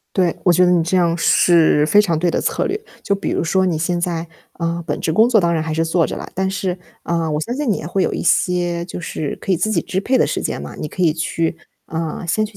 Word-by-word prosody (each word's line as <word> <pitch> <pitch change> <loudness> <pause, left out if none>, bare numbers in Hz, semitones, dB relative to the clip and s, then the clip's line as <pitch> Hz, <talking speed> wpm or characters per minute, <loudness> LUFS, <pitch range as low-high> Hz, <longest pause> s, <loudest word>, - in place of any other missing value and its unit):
对， 180 -3 +2
我 180 - +5
觉 180 +2 +4
得 180 - +4
你 170 -2 +3
这 170 +3 0
样 170 -1 +2
是 165 -3 +4
非 205 +5 +5
常 170 -6 +1
对 175 +1 +1
的 - - 0
策 - - -1
略。 410 +3 -2 0.2
就 200 - +1
比 195 - -3
如 - - 0
说 190 +3 +2
你 165 -3 0
现 175 +1 -1
在， 170 -1 -2 0.3
啊， 170 0 -3
本 145 - -2
职 160 - -1
工 220 +7 +5
作 225 -4 +4
当 170 -1 +1
然 160 -1 0
还 160 -1 -3
是 165 +1 +1
做 165 0 +2
着 - - -5
了， - - -7
但 190 0 0
是， 190 -2 -2 0.2
啊， 165 -2 -1
我 150 0 -1
相 235 +9 -3
信 280 -4 -1
你 - - +2
也 155 - -6
会 190 +2 0
有 - - 0
一 - - -3
些 175 -1 +1
就 180 - -6
是 155 -2 -4
可 195 - -1
以 - - +3
自 215 +6 0
己 175 -6 +1
支 190 +4 -2
配 255 +5 +1
的 - - +3
时 - - -2
间 - - -3
嘛， 70 0 -8
你 150 - -5
可 185 - -4
以 160 -3 +4
去 165 0 -2 0.3
啊， 160 +1 -4
先 215 +5 +1
去 210 -1 -9
175 Hz, 305 characters per minute, -19 LUFS, 165-190 Hz, 0.3 s, 我